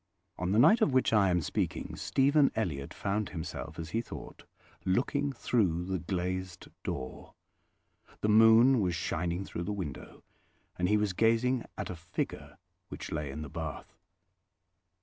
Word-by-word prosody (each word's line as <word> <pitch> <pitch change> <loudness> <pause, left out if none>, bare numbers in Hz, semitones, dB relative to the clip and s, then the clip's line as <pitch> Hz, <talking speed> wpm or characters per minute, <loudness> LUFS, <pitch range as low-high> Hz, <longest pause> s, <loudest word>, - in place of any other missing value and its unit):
On 90 0 -1
the 105 - +2
night 210 - +6
of 140 - +3
which 130 -3 +3
I 100 -3 +5
am 90 -1 +2
speaking, - - -2
Stephen 140 +1 +3
Elliott 75 -11 -2
found 105 +1 -2
himself, 80 -3 -6
as 80 0 -6
he 115 - 0
thought, - - -10 0.4
looking 140 +8 +1
through 95 -9 0
the 95 0 -2
glazed 90 0 -3
door. 65 -1 -6 0.9
The - - +1
moon 115 +4 +7
was 90 -3 0
shining 85 +3 -2
through 85 - -5
the 105 - -2
window, 90 -10 -6 0.5
and 90 0 0
he 105 - +4
was 105 -2 0
gazing 115 +4 +2
at 105 - -4
a - - -5
figure 85 +3 -5 0.3
which - - -7
lay 75 -2 -3
in 75 +3 -5
the - - -6
bath. 80 0 -6
95 Hz, 155 wpm, -30 LUFS, 85-115 Hz, 0.9 s, moon